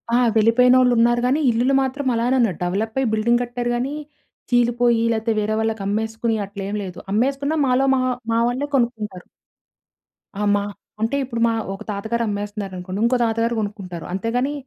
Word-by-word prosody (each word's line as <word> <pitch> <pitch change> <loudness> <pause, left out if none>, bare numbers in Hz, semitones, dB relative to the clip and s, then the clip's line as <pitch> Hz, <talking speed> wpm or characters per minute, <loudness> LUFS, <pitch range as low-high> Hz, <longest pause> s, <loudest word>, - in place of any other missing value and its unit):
ఆ! - - +5 0.2
వెళ్ళిపోయినోళ్ళున్నారు 240 +1 +4
గానీ, 265 +4 +2
ఇల్లులు 240 +3 +2
మాత్రం 270 +2 -2
అలానే 240 +3 +1
ఉన్నయి. 225 -8 +2
డెవలప్పయి 220 +8 -1
బిల్డింగ్ 235 +3 +2
కట్టారు 240 0 -3
గానీ, 255 +4 -2 0.6
చీలిపోయి 240 -1 +3
లేతే 225 +1 -1
వేరే 215 +1 0
వాళ్ళకి 220 -1 -1
అమ్మేసుకుని 220 +2 -1
అట్లేమి 200 +1 -5
లేదు. 180 -2 -7
అమ్మేసుకున్న 275 +7 0
మాలో 255 +1 +2
మా - - +1 0.3
మా 230 - +2
వాళ్ళే 255 +4 -2
కొనుక్కుంటారు. 220 -7 -1 1.1
ఆ! - - -3
మా 205 - 0 0.4
అంటే, 225 +5 0
ఇప్పుడు 235 -3 -4
మా 230 - +1 0.2
ఒక 195 +2 -8
తాతగారమ్మేస్తన్నారనుకోండి, 205 -3 -3
ఇంకో 250 +2 +3
తాతగారు 230 +1 0
కొనుక్కుంటారు. 195 -5 -6
అంతేగానీ, 240 +8 -1
230 Hz, 145 wpm, -21 LUFS, 210-245 Hz, 1.1 s, ఆ